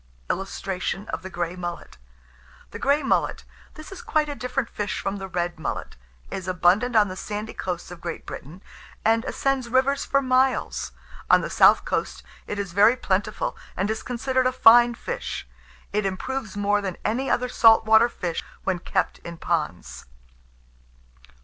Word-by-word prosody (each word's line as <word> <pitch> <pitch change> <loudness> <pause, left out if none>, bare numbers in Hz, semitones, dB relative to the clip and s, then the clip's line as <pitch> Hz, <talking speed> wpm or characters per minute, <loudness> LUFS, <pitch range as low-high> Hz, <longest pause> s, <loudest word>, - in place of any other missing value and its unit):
[Illustration: 195 0 -3
THE 190 - -7
GREY 175 -1 -3
MULLET.] 175 - -6 0.7
THE - - -7
GREY 285 +2 +2
MULLET. - - 0 0.3
This 310 +3 -11
is 390 - -8
quite 310 -11 0
a - - -2
different 250 -2 -2
fish 210 -2 -3
from 195 +1 -3
the 195 -1 -6
red 175 -2 -3
mullet, - - -4 0.4
is 190 -1 -5
abundant 185 +7 +2
on 210 -2 +6
the 185 - -6
sandy 210 +3 -5
coasts 180 -1 -4
of 175 -1 -10
Great 170 -1 -5
Britain, 170 +8 -9 0.4
and 225 +1 +3
ascends 270 -3 -1
rivers 265 +3 +2
for 275 - +2
miles. 260 -1 +1 0.4
On - - +6
the - - -4
south - - +6
coast - - -2 0.2
it 205 - -4
is 195 -4 -4
very 210 +5 +6
plentiful, 200 -2 -1 0.2
and 200 +3 0
is 220 - -3
considered 255 +1 0
a - - +1
fine 240 -1 +6
fish. 485 - -5 0.5
It 210 +1 +1
improves 215 +2 -4
more 205 0 +2
than 190 -3 -4
any 245 +5 0
other 250 +1 +1
salt 225 -2 +5
water 220 +2 +6
fish 175 -7 -4 0.2
when 185 -2 0
kept - - -1
in 170 0 -9
ponds. 155 - -3
210 Hz, 160 wpm, -24 LUFS, 185-255 Hz, 0.7 s, on